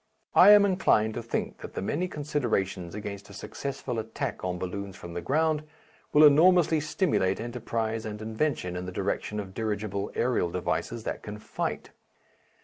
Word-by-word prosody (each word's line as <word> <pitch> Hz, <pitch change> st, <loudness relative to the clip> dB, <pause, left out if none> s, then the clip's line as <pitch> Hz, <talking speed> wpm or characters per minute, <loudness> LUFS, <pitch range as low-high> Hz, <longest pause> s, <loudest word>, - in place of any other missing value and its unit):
I -, -, +8 dB
am 205 Hz, -1 st, +9 dB
inclined 110 Hz, -, +2 dB
to 120 Hz, -, -4 dB
think 115 Hz, -, -3 dB
that -, -, -9 dB
the -, -, -2 dB
many 170 Hz, -, -1 dB
considerations 120 Hz, -, -2 dB
against 100 Hz, -1 st, -6 dB
a -, -, -11 dB
successful 130 Hz, +2 st, -4 dB
attack 115 Hz, +3 st, -4 dB
on 90 Hz, -1 st, -2 dB
balloons 95 Hz, +2 st, -5 dB
from 85 Hz, -2 st, -9 dB
the 85 Hz, -, -3 dB
ground, 155 Hz, -, +1 dB, 0.5 s
will 150 Hz, -, +6 dB
enormously 160 Hz, +2 st, +6 dB
stimulate 150 Hz, -, +1 dB
enterprise 115 Hz, -1 st, -3 dB
and 105 Hz, -2 st, -5 dB
invention 110 Hz, -4 st, -2 dB
in 90 Hz, 0 st, -4 dB
the -, -, -4 dB
direction 100 Hz, +2 st, -2 dB
of 95 Hz, -2 st, -6 dB
dirigible 105 Hz, -2 st, -2 dB
aerial 120 Hz, -8 st, +1 dB
devices 90 Hz, +6 st, -2 dB
that -, -, -4 dB
can 105 Hz, 0 st, -7 dB
fight. 105 Hz, -, -4 dB
110 Hz, 160 wpm, -28 LUFS, 100-145 Hz, 0.5 s, am